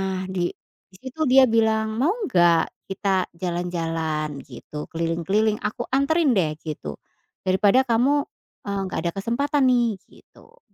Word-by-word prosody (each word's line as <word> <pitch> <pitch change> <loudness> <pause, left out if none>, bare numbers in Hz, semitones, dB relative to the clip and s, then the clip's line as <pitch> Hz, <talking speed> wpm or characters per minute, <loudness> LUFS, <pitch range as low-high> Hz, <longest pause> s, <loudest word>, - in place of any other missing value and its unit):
Nah 190 -1 -2
di 175 -2 0 0.4
di 185 - -17
situ 265 +4 -9
dia 265 +1 +7
bilang 220 -1 +1
mau 330 +10 +2
nggak 175 - +2
kita 195 -1 0
jalan-jalan 165 -4 -2
gitu 150 0 -8
keliling-keliling 170 +6 0
aku - - -4
anterin, 280 +2 +3
deh, 155 -5 +1
gitu, 110 - -6 0.5
daripada 200 +6 +4
kamu, 260 +5 +3 0.4
eee, 200 0 -2
nggak - - -4
ada 170 - 0
kesempatan, 280 +7 0
nih, 235 -5 +2
gitu. 475 +2 -21
195 Hz, 135 wpm, -23 LUFS, 170-245 Hz, 0.5 s, dia